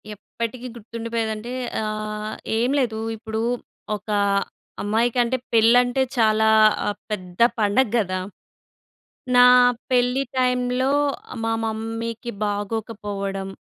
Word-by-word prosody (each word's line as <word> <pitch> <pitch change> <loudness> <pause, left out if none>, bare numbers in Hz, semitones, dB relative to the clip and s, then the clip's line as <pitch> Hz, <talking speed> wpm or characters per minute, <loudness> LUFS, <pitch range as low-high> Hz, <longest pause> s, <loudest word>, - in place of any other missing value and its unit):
ఎప్పటికీ 235 +4 -6
గుర్తుండిపోయేదంటే 230 0 -4 0.3
ఆహ్, 215 0 -4 0.2
ఏం 240 +3 +1
లేదు. 225 -4 -1 0.2
ఇప్పుడు 220 0 -4 0.5
ఒక 210 +1 -11 0.7
అమ్మాయికంటే 235 +4 +1 0.2
పెళ్ళంటే 245 +3 +4 0.2
చాలా 220 -1 +3 0.7
పెద్ద 180 -3 -6 0.2
పండగ 210 +4 +2
కదా! 185 -2 -1 1.2
నా 245 0 +8 0.5
పెళ్ళి 250 +2 +2
టైమ్‌లో 250 +1 +1 0.5
మా 225 - 0
మమ్మీకి 225 +1 -4
బాగోకపోవడం. 205 -2 -3
225 Hz, 85 wpm, -23 LUFS, 215-245 Hz, 1.2 s, నా